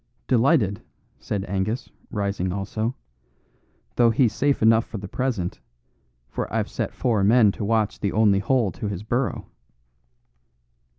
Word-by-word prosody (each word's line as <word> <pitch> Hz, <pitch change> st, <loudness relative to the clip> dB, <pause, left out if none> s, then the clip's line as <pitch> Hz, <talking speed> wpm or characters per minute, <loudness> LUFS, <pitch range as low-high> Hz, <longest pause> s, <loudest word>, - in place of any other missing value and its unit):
"Delighted," 120 Hz, -, +3 dB, 0.4 s
said 100 Hz, -2 st, -3 dB
Angus, 100 Hz, +5 st, -2 dB, 0.2 s
rising 100 Hz, -3 st, -2 dB
also, 110 Hz, +5 st, -3 dB, 1.0 s
"though 120 Hz, -1 st, +5 dB
he's 115 Hz, -1 st, +2 dB
safe 140 Hz, +1 st, +1 dB
enough 110 Hz, 0 st, +5 dB
for 110 Hz, -, -8 dB
the 100 Hz, 0 st, -7 dB
present, 110 Hz, -6 st, -2 dB, 0.7 s
for -, -, -4 dB
I've -, -, -1 dB
set -, -, -2 dB
four 110 Hz, -5 st, +1 dB
men 110 Hz, 0 st, +5 dB
to 105 Hz, -, -6 dB
watch 110 Hz, 0 st, 0 dB
the 100 Hz, -, -1 dB
only 105 Hz, -2 st, +3 dB
hole 115 Hz, -1 st, +1 dB
to 110 Hz, -, -5 dB
his 100 Hz, -1 st, -4 dB
burrow." 120 Hz, +4 st, -1 dB
110 Hz, 135 wpm, -24 LUFS, 100-120 Hz, 1.0 s, though